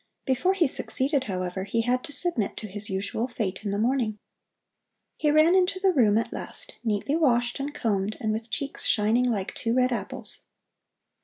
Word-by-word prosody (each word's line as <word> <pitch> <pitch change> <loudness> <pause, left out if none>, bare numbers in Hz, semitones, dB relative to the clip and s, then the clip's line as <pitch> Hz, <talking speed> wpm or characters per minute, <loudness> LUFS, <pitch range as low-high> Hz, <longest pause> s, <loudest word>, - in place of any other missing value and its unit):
Before 270 +9 +1
he 355 -3 +3
succeeded, 270 +1 +2
however, 185 -1 -3
he 220 +4 0
had 250 +2 0
to 305 - -9
submit 290 - +2
to 215 - -5
his 205 +1 -6
usual 200 +5 -2
fate 215 -6 -3
in 205 - -2
the 200 - -1
morning. 230 -1 0 1.0
He 300 - +1
ran 310 +3 +5
into 375 0 +2
the 380 -1 +3
room 220 -8 +4
at 230 - -1
last, - - -6
neatly 220 +6 0
washed 245 -6 +2
and 280 +1 -3
combed 215 -7 -1
and 215 - -1
with 225 +1 -4
cheeks 280 +4 -3
shining 225 +3 +3
like 210 -6 -1
two 230 +1 -1
red 255 0 +3
apples. 240 - -3
240 Hz, 180 wpm, -26 LUFS, 210-285 Hz, 1.0 s, ran